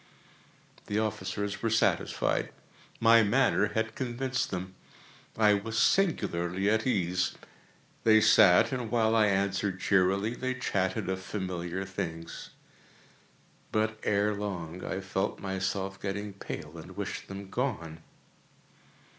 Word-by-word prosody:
The 105 - -1
officers 100 -2 -2
were 115 - +1
satisfied. 115 0 +1 0.5
My 115 0 +7
manner 110 -1 +2
had 110 0 0
convinced 130 +1 -2
them. 95 0 -5 0.6
I 105 -2 +5
was 110 +3 -2
singularly 95 - +1
at 110 +3 +1
ease. 90 -6 0 0.7
They 110 -1 +6
sat, 90 -2 +6
and 125 -4 -3
while 115 -1 +2
I 110 -1 +5
answered 100 -1 0
cheerily, 100 +4 +2
they 130 +1 -3
chatted 95 -5 -1
of 95 0 -2
familiar 95 -2 -4
things. 85 -3 -6 1.2
But, 110 0 0
ere 105 +1 +1
long, 90 -4 -5
I 95 - -3
felt 95 0 -2
myself 95 0 -3
getting 100 +1 -4
pale 85 -4 -7
and 90 +4 -11
wished 100 -1 -4
them 95 0 -8
gone. 95 - -3
100 Hz, 120 wpm, -29 LUFS, 95-110 Hz, 1.2 s, My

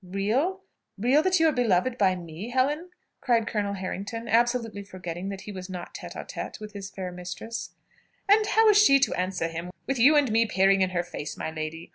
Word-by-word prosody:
"Real? 225 - -1 0.3
real 250 +9 +3
that 370 +1 +2
you 325 - +5
are - - +4
beloved 240 -2 +1
by 190 -5 +3
me, 175 +4 -7
Helen?" 290 +7 0 0.3
cried 235 -4 +2
Colonel 205 -2 -2
Harrington, 200 +4 -5
absolutely 230 -2 +1
forgetting 180 -1 -6
that 195 -1 -6
he 210 - -8
was 185 -1 -8
not 180 -2 -7
tête - - -8
à - - -7
tête - - -6
with 210 -1 -9
his 195 -2 -7
fair 190 -2 -6
mistress. 180 +6 -7 0.5
"And 420 +1 +5
how 445 +1 +4
is 420 0 +6
she 275 -9 +7
to 265 -5 +2
answer 180 -2 -1
him, 165 +2 -6 0.2
with 270 -2 -2
you 285 +6 +6
and 285 -6 +3
me 225 +1 +3
peering 195 -1 +3
in 185 - +3
her 175 -1 -1
face, 160 -4 -7
my - - -4
lady? 155 +1 -6
205 Hz, 210 wpm, -26 LUFS, 185-255 Hz, 0.5 s, she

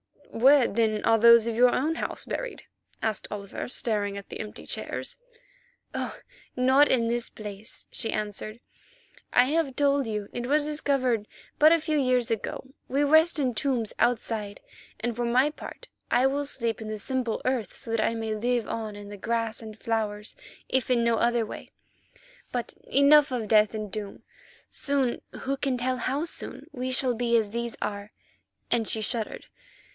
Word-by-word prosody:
"Where, 265 +3 +6
then, 215 -1 0
are 225 0 +4
those 235 0 +8
of 230 -1 -2
your 250 +2 +6
own 305 +7 0
house - - -2
buried?" - - -5 0.4
asked 220 -3 -1
Oliver, 200 -1 -5
staring 205 -5 -1
at 200 - -9
the - - -7
empty 210 -1 -7
chairs. - - -4 0.8
"Oh! - - -3 0.4
not 260 +3 +5
in 235 -3 +2
this 240 0 0
place," 210 0 -8
she 225 - -2
answered; 215 +2 -4 0.7
"I 245 - +5
have 290 -1 0
told 280 -2 +2
you 210 -2 -3
it 240 0 -3
was 295 +2 +3
discovered 270 -7 0 0.3
but 310 +1 +8
a 335 - +2
few 310 -1 0
years 255 -3 +2
ago. 225 - -3 0.2
We 275 +3 +1
rest 315 +3 +5
in 260 -4 +1
tombs 235 -2 -1
outside, 220 -4 0 0.4
and 240 0 -1
for 240 +1 -1
my 255 +5 +3
part - - -10 0.2
I 250 - +3
will 280 +2 +1
sleep 230 -5 -1
in 220 - -6
the 215 0 -4
simple 250 +1 -2
earth, 250 -7 -1
so 230 - -7
that 225 -1 +1
I 230 - +1
may 225 -1 -2
live 240 +1 0
on 220 -2 -4
in 205 0 -8
grass 230 +1 -1
and 220 -1 -9
flowers, 215 -2 -2 0.3
if 260 -1 0
in 240 -2 +3
no 235 -1 +2
other 235 -1 +2
way. - - -9 0.8
But 245 -1 -3
enough 280 +1 +6
of 230 -5 -2
death 215 0 +4
and 210 -2 -4
doom. 205 0 -6 0.5
Soon, 275 -4 0 0.2
who 275 +1 -1
can 270 -2 0
tell 255 +1 -1
how 270 +5 -1
soon? 335 - -4
we 255 0 -3
shall 255 -1 +2
be 235 0 +2
as 215 -3 0
these 235 0 -3
are," 205 0 -4 0.6
and 225 -2 +2
she 220 - +1
shuddered. 220 0 -2
235 Hz, 175 wpm, -27 LUFS, 220-265 Hz, 0.8 s, those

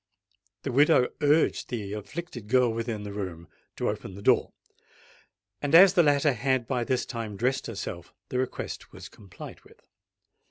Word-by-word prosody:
The 135 - -2
widow 140 -1 +4
urged 150 +2 +2
the 105 -5 -4
afflicted 110 - -7
girl 125 0 +3
within 115 -2 -3
the 100 -1 -6
room 90 -5 -6 0.3
to - - -2
open 95 - -4
the 100 - -10
door; - - +3 1.1
and 145 +2 +2
as 185 +2 +9
the 180 - +5
latter 145 -2 +3
had 130 +1 0
by 120 +1 -1
this 130 +1 -1
time 115 -5 -6
dressed 130 +5 0
herself, 95 -5 -6 0.2
the 125 - -1
request 130 - -4
was - - -11
complied 95 -4 -12
with. - - -20
120 Hz, 160 wpm, -27 LUFS, 105-140 Hz, 1.1 s, as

